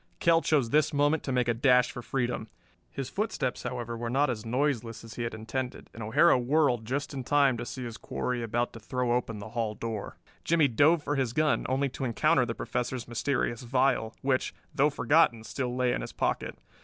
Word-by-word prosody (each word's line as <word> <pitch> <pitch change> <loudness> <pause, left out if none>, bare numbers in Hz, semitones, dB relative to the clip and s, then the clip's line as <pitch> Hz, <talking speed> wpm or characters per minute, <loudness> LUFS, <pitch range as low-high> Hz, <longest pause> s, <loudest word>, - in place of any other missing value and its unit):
Kell 165 -1 +4
chose 140 -6 +1
this 150 -1 +3
moment 145 +2 +3
to 135 - -4
make 125 -1 +1
a 120 - +3
dash 125 +1 +4
for 125 - -7
freedom. 120 -3 -2 0.4
His 135 -2 -5
footsteps, 200 - -2
however, 120 -2 -4
were 115 0 -4
not 135 +2 +2
as 110 -3 -5
noiseless 120 -3 -1
as 115 -1 -10
he 120 - -6
had 115 -1 -3
intended, 125 +3 -5
and 115 - -9
O'Hara 125 +7 +4
whirled 125 -3 +2
just 140 +5 -3
in 135 -2 -4
time 140 -1 +3
to 120 +1 -5
see 130 - -6
his 115 -1 -6
quarry 125 0 -3
about 120 +1 -1
to 115 - -9
throw 125 +2 -2
open 120 -2 -1
the 100 +1 -8
hall 115 -2 -2
door. 110 -2 -5 0.3
Jimmie 160 -3 +3
dove 150 +6 +4
for 145 -1 -1
his 130 -4 0
gun, 155 +1 +1
only 135 +2 +1
to 130 - -6
encounter 130 +2 +2
the 115 - -3
Professor's 125 0 -3
mysterious 120 -1 -1
vial, 125 -2 +1
which, 130 -1 0 0.2
though 145 +2 +3
forgotten, 145 -6 +3
still 125 +1 -3
lay 125 -1 +1
in - - -2
his - - -7
pocket. - - -2
125 Hz, 205 wpm, -29 LUFS, 115-140 Hz, 0.4 s, Kell